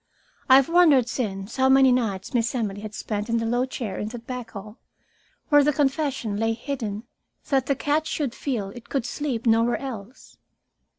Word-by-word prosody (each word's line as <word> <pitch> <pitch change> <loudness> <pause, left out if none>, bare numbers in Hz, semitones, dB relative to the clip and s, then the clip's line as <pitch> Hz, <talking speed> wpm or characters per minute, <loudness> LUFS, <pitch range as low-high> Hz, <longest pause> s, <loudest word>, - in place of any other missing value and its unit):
I 260 - +9
have 270 -1 +5
wondered 320 -8 +5
since 200 -3 -4
how 265 0 +4
many 265 -1 +6
nights 215 -7 -1
Miss 240 0 0
Emily 205 -4 -2
had 215 0 -7
spent 210 +1 -4
in 230 - +1
the 230 - -1
low 245 +3 0
chair 220 -7 -5
in 210 - -3
that 235 +1 -8
back 250 -3 -6
hall, 210 +2 -10 0.7
where 290 -1 +6
the 295 - +3
confession 270 -6 -1
lay 225 +1 +1
hidden, 225 -4 -4 0.5
that 270 -2 +1
the 280 - +2
cat 295 +3 0
should 280 -6 -2
feel 240 -9 -3
it 240 +2 -12
could 270 -4 -1
sleep 255 -3 -3
nowhere 230 +1 +3
else. 245 -3 -9
240 Hz, 185 wpm, -24 LUFS, 220-270 Hz, 0.7 s, I